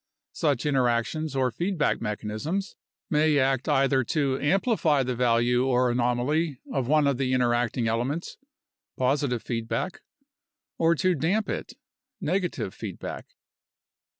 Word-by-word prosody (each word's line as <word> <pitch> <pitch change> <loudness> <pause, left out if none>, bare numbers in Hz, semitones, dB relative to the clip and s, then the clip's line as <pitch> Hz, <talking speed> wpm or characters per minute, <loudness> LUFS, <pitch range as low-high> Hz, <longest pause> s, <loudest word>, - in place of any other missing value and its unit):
Such 145 -6 0
interactions 135 +2 0
or 130 -2 +1
feedback 170 - 0
mecha 105 -2 -4
nisms 155 - -3 0.4
may 150 -1 +3
act 135 -1 +1
either 135 -1 +3
to 140 -3 0
amplify 165 - +2
the 125 0 -2
value 120 +1 +2
or 125 -1 +3
anomaly 125 +5 0
of 135 -4 -1
one 150 +1 +4
of 140 -2 +1
the 130 -1 0
interacting 120 -1 +1
elements 125 +9 -2 0.6
(positive 130 -2 0
feedback) 115 - -3 0.8
or 165 0 +4
to 185 +3 +2
damp 185 +7 0
it - - -4 0.5
(negative 175 - -2
feed 105 -6 -7
back). - - -7
135 Hz, 125 wpm, -26 LUFS, 120-155 Hz, 0.8 s, one